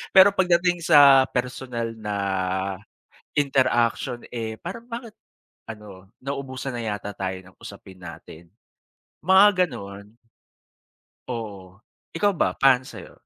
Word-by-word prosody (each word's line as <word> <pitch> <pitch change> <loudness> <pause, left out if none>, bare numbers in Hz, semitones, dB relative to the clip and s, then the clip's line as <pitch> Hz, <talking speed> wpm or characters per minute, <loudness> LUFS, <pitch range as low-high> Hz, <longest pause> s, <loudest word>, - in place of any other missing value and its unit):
pero 190 +1 +9
pagdating 175 -2 +2
sa 140 -2 +7
personal 125 -2 -4
na 105 -2 -4 1.2
interaction 125 -4 +1
eh, 110 -2 -4
parang 230 0 -7
bakit 230 -2 -7 0.6
ano 100 -3 -11
nauubusan 135 -1 -5
na 120 - -4
yata 105 -1 -4
tayo 95 -1 -4
ng 90 - -18
usapin 95 -1 -12
natin, 85 -1 -12 0.8
mga 190 0 +5
ganon. 100 -3 -10 1.1
Oo, 100 -5 -7 0.3
ikaw 205 +4 +2
ba 180 - -1
para 135 -2 +5
sa'yo? - - -12
125 Hz, 110 wpm, -24 LUFS, 105-160 Hz, 1.2 s, pero